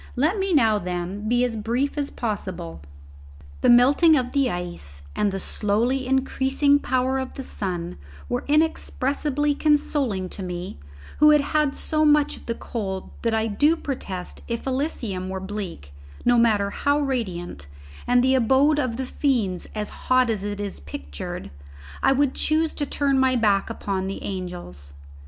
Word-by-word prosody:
Let 310 - +1
me 385 0 0
now, 225 -9 +4
then, 180 +3 -4
be 245 +1 +3
as 245 -2 -1
brief 235 +6 -1
as 285 -1 -1
possible. 130 - -4 0.8
The - - +4
melting 280 +7 +6
of 250 -2 -1
the 275 -2 +2
ice 175 - -6
and 205 - +1
the 195 - -3
slowly 235 +8 0
increasing 270 +2 +2
power 260 0 0
of 260 0 -5
the 270 - -5
sun 175 - -4 0.3
were 120 - -2
inexpressibly 295 -1 +1
consoling 285 -10 +1
to 195 - -6
me 180 - -5 0.4
who 300 +1 +7
had 300 -1 +6
had 295 0 0
so 310 0 0
much 295 -1 +4
of - - -15
the 230 - -1
cold 190 -6 -5
that 230 -1 +1
I 220 0 +1
do 290 +10 +3
protest 195 - -5
if 235 -1 -4
Elysium 250 - -2
were 190 0 -3
bleak, 190 - -6 0.3
no 245 -1 +5
matter 210 -4 +3
how 285 +6 +1
radiant, 185 - -3 0.4
and 245 0 +4
the 260 +1 +3
abode 265 +4 +4
of 250 -4 -1
the 265 - -2
fiends 235 -10 -1
as 210 -1 -3
hot 255 -2 +2
as 205 -3 -2
it 205 0 -4
is 205 -1 -4
pictured, 70 -2 -7 0.5
I - - +4
would 270 0 +2
choose 315 0 +1
to 290 - -3
turn 275 -2 +1
my 260 -1 +3
back 205 -4 +2
upon 190 -1 -3
the 195 - -5
angels. 175 - -7
240 Hz, 165 wpm, -24 LUFS, 190-280 Hz, 0.8 s, who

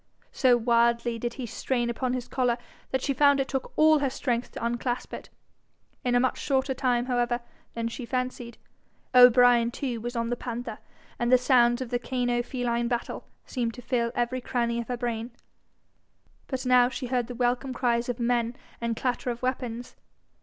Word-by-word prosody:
So 250 -3 +4
wildly 235 0 +2
did 240 +1 -3
he 260 - -5
strain 240 +2 -1
upon 250 +2 -1
his 250 -1 -3
collar, 245 -2 0 0.3
that 265 -1 -1
she 275 - +1
found 285 0 +4
it 270 - 0
took 265 -1 -3
all 310 0 +5
her 280 -2 +1
strength 245 -2 -2
to - - -4
unclasp 240 +1 -2
it. - - -7 0.7
In 245 -1 +1
a - - +5
much 255 0 0
shorter 265 -1 0
time, 245 -2 +1
however, 245 -1 0 0.4
than 230 0 -2
she 235 +1 -6
fancied, 250 -1 -3 0.6
O'Brien 245 -1 +7
too 240 -2 -4
was 240 +2 -5
on 230 0 -1
the - - +1
panther, 245 0 -5 0.4
and 240 +1 +1
the 255 - +8
sounds 245 -1 +3
of 245 -1 -10
cano 245 0 0
feline 240 -1 -1
battle 240 0 -3 0.2
seemed 235 -3 -2
to 245 - -10
fill 235 -2 0
every 245 +1 -1
cranny 235 -1 -1
of 230 - -9
her 245 - -3
brain. 235 -1 -3 1.2
But 260 -1 -4
now 250 -1 +5
she 260 0 -5
heard 245 -1 -1
the 245 - -7
welcome 245 +2 0
cries 240 -1 0
of 245 - -3
men 235 0 0 0.3
and 230 -1 -1
clatter 250 -1 -1
of 240 +1 -5
weapons. 245 -2 -3
245 Hz, 180 wpm, -27 LUFS, 235-255 Hz, 1.2 s, the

